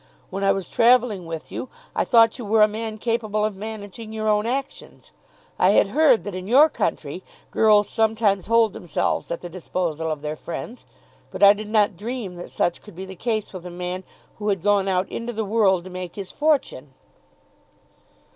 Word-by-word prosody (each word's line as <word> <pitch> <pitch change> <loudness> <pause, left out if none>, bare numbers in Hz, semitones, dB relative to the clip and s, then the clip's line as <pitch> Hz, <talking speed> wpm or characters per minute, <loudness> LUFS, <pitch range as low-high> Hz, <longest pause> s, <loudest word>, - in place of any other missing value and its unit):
When 195 +1 -3
I 195 - +4
was 195 -3 -2
travelling 230 -6 +3
with 165 -1 -7
you, 255 - -5 0.3
I - - +1
thought 230 0 +4
you - - -5
were 215 +1 +4
a - - +6
man 215 +1 -5
capable 215 -2 -1
of 215 -2 -2
managing 215 +1 -8
your 215 0 -3
own 210 +1 +2
actions. 270 +3 -5 0.5
I - - +5
had - - +4
heard 295 -7 +4
that 205 - -6
in 185 +1 -6
your 280 +8 +6
country - - -3 0.3
girls 210 -2 +4
sometimes 220 -3 +1
hold 230 -2 +3
themselves 170 - -2
at 170 - -4
the 175 - -6
disposal 170 -2 -3
of 155 -2 -3
their 150 0 -3
friends, 195 +10 -7 0.4
but - - -3
I 200 0 +9
did 210 0 -7
not 210 -4 +2
dream 225 -2 -5
that 175 - -8
such 175 - -1
could 210 -5 -14
be 190 +2 -7
the 190 0 -9
case 215 +1 -2
with 185 -2 -8
a - - -6
man 180 +1 -5 0.4
who 210 0 -1
had 195 -4 -1
gone 205 -1 +2
out 185 0 +1
into 235 +1 -5
the 220 -1 -2
world 195 -4 +2
to 185 - -10
make 180 -1 -7
his 195 -2 -7
fortune." 275 - -1
205 Hz, 195 wpm, -23 LUFS, 185-225 Hz, 0.5 s, I